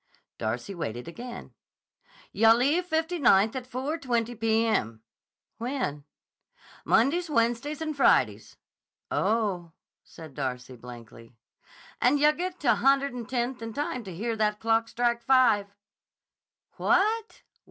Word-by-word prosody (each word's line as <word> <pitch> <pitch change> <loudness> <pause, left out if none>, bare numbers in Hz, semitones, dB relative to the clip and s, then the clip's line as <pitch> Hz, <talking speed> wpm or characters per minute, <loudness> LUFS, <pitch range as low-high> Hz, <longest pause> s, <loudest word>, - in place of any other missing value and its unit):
Darcy 120 - -3
waited 120 - -5
again. 240 +8 -9 0.8
"Yah 225 +1 +6
leave 295 +9 +1
Fifty 325 +1 -1
Ninth 215 -3 +4
at 255 -1 -6
4.20 250 -4 -2
p.m." 220 - 0 0.6
"When?" 230 - -3 0.8
"Mondays, 315 +9 +2
Wednesdays, 255 +4 0
and 310 -1 -3
Fridays." 275 - +2 0.5
"Oh!" 195 -7 0 0.3
said 160 -4 -13
Darcy 130 -2 -5
blankly. 115 -1 -13 0.7
"And 265 +4 +4
yah 300 +1 +5
get 355 +3 -5
to 255 -6 +4
a - - +3
Hundred'n 270 -3 +1
Tenth 245 -1 -2
in 225 -1 -6
time 255 -3 -3
to 185 -3 -8
hear 225 +5 -2
that 210 -1 0
clock 225 0 +1
strike 235 0 0
5." 250 -6 +4 1.1
"What! 430 +5 +1
235 Hz, 120 wpm, -27 LUFS, 195-275 Hz, 1.1 s, Yah